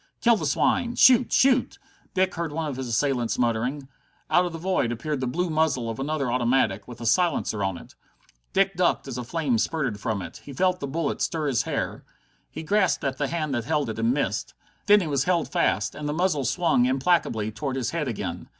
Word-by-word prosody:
"Kill 235 -1 +4
the - - -2
swine! 245 -2 +1
Shoot! 250 -1 +6
Shoot!" 260 -1 +3 0.4
Dick 185 0 +2
heard 170 -2 -3
one 160 +2 -3
of 145 -3 -4
his 130 -1 -4
assailants 120 0 0
muttering. 125 +4 -1 0.4
Out 180 0 +4
of - - -6
the 165 - -6
void 175 -8 0
appeared 140 +5 -3
the 130 - -2
blue 175 +9 -1
muzzle 155 -7 +1
of 115 - -8
another 140 -2 -1
automatic, 120 -5 +1
with 120 -1 -10
a - - -5
silencer 115 - +1
on 95 -2 -1
it. - - -13 0.6
Dick 195 0 +2
ducked 175 -4 +1
as 125 -2 -5
a - - -4
flame 130 -3 0
spurted 130 -7 -1
from 105 -3 -2
it. 85 - -9
He 140 - -9
felt 185 +4 +1
the 140 - -4
bullet 160 +2 -2
stir 160 -2 -1
his 135 -5 +1
hair. - - -3 0.5
He - - -7
grasped 200 0 +1
at 135 -2 -2
the 145 - 0
hand 155 -1 -2
that 120 -2 -2
held 150 -4 0
it, 110 - -7
and 115 +1 +2
missed. 110 -8 -2 0.3
Then 205 0 +7
he 170 - -3
was 140 -2 0
held 175 -3 0
fast, 100 0 +1
and 150 -1 -5
the - - -1
muzzle 160 -5 0
swung 135 -2 +2
implacably 130 -6 +1
toward 135 +4 -4
his 125 -2 -2
head 165 -4 -2
again. 115 - -4
140 Hz, 215 wpm, -25 LUFS, 120-170 Hz, 0.6 s, Then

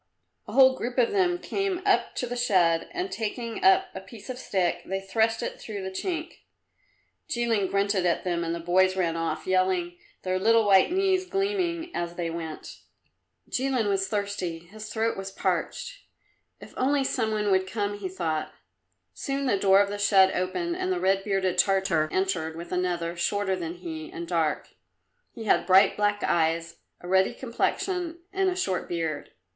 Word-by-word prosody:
A - - -8
whole 260 -1 +6
group 245 0 -5
of 245 -2 +3
them 365 -3 +2
came 390 0 -2
up - - +2
to - - -1
the 245 0 -4
shed, 180 -9 +2
and 365 +2 -3
taking 230 +1 -4
up 380 0 +5
a 190 - -6
piece 225 +5 -10
of 250 - -7
stick, 185 -8 0
they 195 +1 -3
thrust 220 +4 0
it - - -5
through 205 -3 -6
the 190 - -4
chink. 325 - -4 0.9
Jilin 230 -7 0
grunted 200 -1 +1
at 175 -1 +1
them 175 -2 -1
and 165 0 -2
the - - -5
boys 185 +2 +3
ran 170 -3 0
off, 165 0 -2
yelling, 185 -2 +1 0.2
their 185 0 0
little 225 +2 +4
white 195 - +5
knees 375 0 +1
gleaming 365 -4 -1
as 175 0 -3
they 170 -2 -3
went. 165 -2 -7 0.7
Jilin 255 -4 0
was 195 -1 +1
thirsty; 200 -5 -2
his 210 +6 -10
throat 225 0 0
was 195 0 -5
parched. 195 - -2 0.6
"If - - -13
only 275 +2 +2
some 230 -4 0
one 210 -1 0
would 190 0 +2
come," 205 -1 -1
he 190 -2 -4
thought. 165 -4 -3 0.6
Soon 275 0 -3
the 250 - +2
door 195 0 +5
of 200 - 0
the 205 - -4
shed 195 -2 +5
opened 340 - -2
and 370 0 -1
the 365 - 0
red 195 - +2
bearded 195 -3 0
Tartar 190 -6 +2
entered 180 -4 -1
with 170 +1 -8
another, 175 -2 -1
shorter 190 +2 0
than 170 -2 -5
he, 160 -3 -7
and 170 0 -6
dark. 165 -3 0 0.6
He 230 - -8
had 220 - +2
bright 190 +1 +6
black 205 0 0
eyes, 165 0 0 0.2
a 175 - -9
ruddy 190 +1 +3
complexion 335 +7 -2 0.2
and 385 -1 +2
a 365 - -2
short 190 - -2
beard. 165 -4 -3
195 Hz, 180 wpm, -26 LUFS, 175-245 Hz, 0.9 s, whole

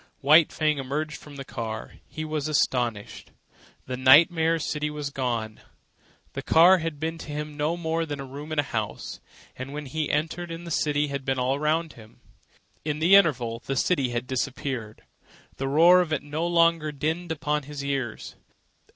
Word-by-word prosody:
White 155 +3 +6
Fang 155 -2 0
emerged 150 +3 -3
from 145 -1 -13
the 135 -1 -7
car. 110 -4 -6
He 155 0 -6
was 155 -1 -2
astonished. 120 -8 -1 0.6
The 125 0 -4
nightmare 160 +5 +5
city 150 -1 -2
was 150 -1 -5
gone. 120 -5 -3 0.7
The - - -4
car 180 +3 +6
had 160 -3 -4
been 165 +1 -3
to - - -9
him 150 0 -5
no 155 +3 -1
more 165 -1 -2
than 145 -2 -5
a 135 - -5
room 145 +4 -9
in 155 - -3
a 145 - +3
house, 110 -6 -4 0.4
and 130 +2 -7
when 150 0 -5
he 150 +3 -2
had - - +1
entered 165 +3 -4
it 165 +1 -7
the 170 - -7
city 150 -1 +1
had 140 -1 -4
been 135 0 -1
all 125 +1 +1
around 155 +3 0
him. 110 0 -16 0.6
In 150 -1 -2
the 165 +5 +3
interval 125 -12 +4
the 135 - -1
city 135 -3 +1
had 120 +1 -3
disappeared. 130 -3 -4 0.5
The 135 - -2
roar 170 +6 +6
of 170 -3 -3
it 155 - -1
no 150 +3 -2
longer 170 -2 +3
dinned 160 +4 -3
upon 150 -1 -1
his 140 -1 -6
ears. 135 -5 -3
150 Hz, 185 wpm, -26 LUFS, 135-160 Hz, 0.7 s, White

